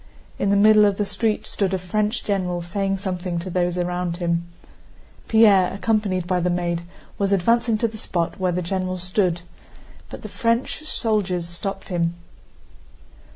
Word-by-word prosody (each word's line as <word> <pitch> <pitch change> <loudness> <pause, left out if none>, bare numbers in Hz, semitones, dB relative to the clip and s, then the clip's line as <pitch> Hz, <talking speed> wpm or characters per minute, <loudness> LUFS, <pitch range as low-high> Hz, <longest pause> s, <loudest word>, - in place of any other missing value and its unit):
In 200 - +1
the 200 - +4
middle 210 +1 +6
of 200 -1 +2
the 205 - 0
street 215 +1 -1
stood 195 -3 -1
a - - 0
French 210 +5 -1
general 180 -4 -1
saying 195 +2 -1
something 180 -2 -3
to 175 +2 -4
those 175 0 0
around 175 -1 -2
him. 170 -1 -1 0.8
Pierre, 205 -5 +5
accompanied 200 -3 0
by 180 0 +1
the 180 +1 +1
maid, 175 -1 -1 0.4
was 200 -1 +1
advancing 230 +4 +2
to 230 - +1
the 220 -1 -9
spot 170 -2 -2
where 185 -1 +1
the 180 +1 -1
general 185 +1 -2
stood, 180 -1 0 0.7
but - - -9
the - - -5
French 230 +5 -1
soldiers 200 - -1
stopped 185 +3 -5
him. 170 -2 0
185 Hz, 160 wpm, -23 LUFS, 175-210 Hz, 0.8 s, middle